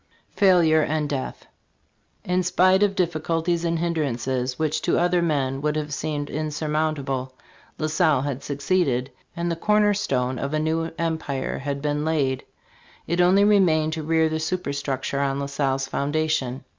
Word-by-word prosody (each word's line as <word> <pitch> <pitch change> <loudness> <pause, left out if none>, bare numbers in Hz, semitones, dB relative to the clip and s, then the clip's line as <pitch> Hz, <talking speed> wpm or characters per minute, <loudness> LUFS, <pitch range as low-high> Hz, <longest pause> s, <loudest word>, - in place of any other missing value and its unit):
FAILURE 175 -5 +4
AND 155 0 0
DEATH 135 -2 -4 0.8
IN 180 +1 +1
spite 185 +1 +3
of 205 -1 +2
difficulties 170 -1 0
and 170 0 0
hindrances 130 -6 -1
which 155 0 -1
to - - +1
other 175 0 +2
men 140 -5 0
would 150 0 0
have 150 -1 -3
seemed 145 0 -3
insurmountable, 150 -4 -2 0.4
La 155 - -2
Salle 155 -3 +2
had 140 -2 -4
succeeded, 140 -3 0 0.2
and 170 0 -2
the - - -1
corner 210 +4 +3
stone 130 - -1
of 140 +2 -2
a - - +1
new 160 +1 0
empire 160 -5 -2
had 140 0 -4
been 150 0 0
laid. 145 -5 0 0.6
It 170 +1 +1
only 185 +3 +5
remained 170 -7 +3
to 160 - -3
rear 160 +1 +2
the 160 0 -2
superstructure 140 -5 -2
on 140 0 0
La 140 - -2
Salle's 135 -1 -1
foundation. 145 -3 -1
155 Hz, 155 wpm, -24 LUFS, 140-170 Hz, 0.8 s, only